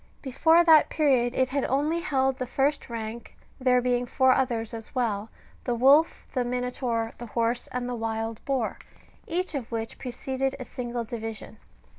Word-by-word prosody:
Before 320 +6 +4
that 320 -3 +6
period 255 -5 +2
it 260 -1 +2
had 280 0 -1
only 295 +5 +1
held 270 -6 +1
the 255 - -2
first 280 +3 0
rank, 230 0 -6 0.2
there 250 -1 +3
being 245 0 +1
four 260 +1 +3
others 235 -4 -1
as 225 +2 -8
well, 225 -4 -1 0.3
the 245 - -1
wolf, 275 +7 +4
the 255 - +1
minotaur, 245 -2 -2
the 240 - -7
horse, 235 +2 -1
and 250 0 -4
the 250 - -3
wild 225 -1 -3
boar, 265 -5 -1 0.5
each 360 0 -2
of 255 -5 -4
which 225 -1 -4
preceded 265 +1 -3
a 255 - -6
single 240 -1 -4
division. 225 -2 -7
250 Hz, 165 wpm, -27 LUFS, 230-270 Hz, 0.5 s, that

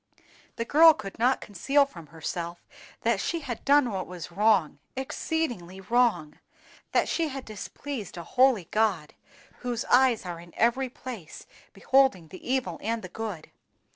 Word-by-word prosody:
The 230 - -3
girl 320 +4 +7
could 200 -1 -8
not 250 +3 +3
conceal 275 +8 +2
from 170 - -12
herself 170 +2 -5 0.4
that 230 -3 +1
she 335 -1 -2
had 245 -6 -6
done 280 -3 +4
what 190 -2 -3
was 175 -1 -8
wrong—exceedingly 210 - -1
wrong; 195 -7 +1 0.5
that - - +2
she 330 -1 0
had 270 -2 -6
displeased 215 0 -7
a 170 - -5
holy 250 -3 +3
God, 210 -8 +1 0.5
whose 240 -2 -3
eyes 250 -4 +4
are 175 -2 -5
in 170 0 -14
every 250 +3 +2
place 235 -10 -9 0.3
beholding 260 - +2
the 185 - -11
evil 220 -11 -1
and 225 +1 -2
the 185 - -7
good. 205 -6 -6
225 Hz, 145 wpm, -27 LUFS, 180-260 Hz, 0.5 s, girl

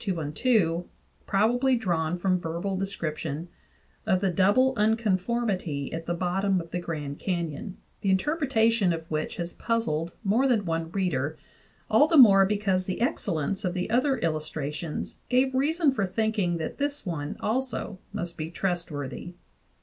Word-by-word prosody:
212), 175 - +1 0.4
probably 245 +6 +3
drawn 175 -6 0
from 185 0 +1
verbal 175 +4 -3
description, 170 -4 -3 0.6
of 190 -3 +3
the 190 -1 +1
double 205 +9 +4
unconformity 210 - 0
at 165 0 -5
the 175 - 0
bottom 190 +2 +1
of 165 -1 -8
the 180 - -1
Grand 150 -5 -5
Canyon, 175 +2 -3 0.2
the 195 - 0
interpretation 225 - +2
of 165 -1 -5
which 155 0 -2
has 175 0 -4
puzzled 170 -8 -1
more 225 +7 +3
than 225 -6 +2
one 165 -1 -2
reader, 160 -6 -1 0.5
all 225 +8 +5
the 325 - +3
more 195 -7 +8
because 195 -3 0
the 185 - -3
excellence 200 - -1
of 180 -1 -1
the 180 +4 -2
other 260 +3 +3
illustrations 155 -1 -3
gave 260 +1 +3
reason 300 +3 +2
for 200 -7 -1
thinking 205 -4 0
that 160 - -5
this 285 -2 -2
one 150 -5 -4
also 235 -4 -2
must 170 -1 -5
be 155 +1 -3
trust 175 0 -2
worthy. 145 +4 -6
190 Hz, 150 wpm, -27 LUFS, 165-225 Hz, 0.6 s, more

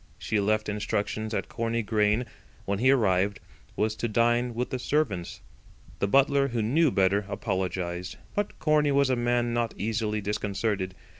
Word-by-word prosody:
She 110 - -1
left 110 +1 +1
instructions 105 +1 -2
that - - -2
Corney 115 0 -2
Grain 105 +2 +1 0.4
when 100 0 -1
he 130 +3 +4
arrived 100 -6 +2 0.4
was 110 0 0
to 120 - -1
dine 120 +2 +1
with 125 +2 -2
the 130 - -2
servants. 125 - -1 0.6
The 100 - +1
butler, 140 +4 +4
who 120 -4 -1
knew 150 +8 +3
better, 100 -2 +2
apologised; 90 -2 -3 0.2
but 205 0 -2
Corney 150 -1 +2
was 140 -1 +3
a - - +3
man 120 0 +1
not 120 -1 -1
easily 110 0 -1
disconcerted. 100 -1 -2
110 Hz, 155 wpm, -27 LUFS, 100-120 Hz, 0.6 s, he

